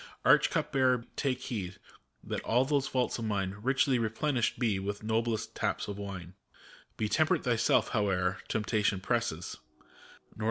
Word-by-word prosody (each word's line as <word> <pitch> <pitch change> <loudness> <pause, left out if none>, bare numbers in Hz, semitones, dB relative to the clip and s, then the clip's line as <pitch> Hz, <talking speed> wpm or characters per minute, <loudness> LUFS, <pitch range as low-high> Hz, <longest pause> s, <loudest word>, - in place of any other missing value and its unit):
Arch - - +6
Cup - - -1
Bearer, 130 -3 +2
take 130 -3 -1
heed, 100 -8 -4 0.5
that - - -3
all 125 +3 +2
those 140 -1 +1
vaults 125 -2 0
of 115 - -3
mine 100 -2 -1
Richly 130 +1 +2
replenished 120 +3 0
be 110 -5 +1
with 100 +2 -4
noblest 110 0 -1
taps - - -1
of 100 0 -5
wine 95 -3 -6
115 Hz, 110 wpm, -31 LUFS, 100-130 Hz, 0.5 s, Arch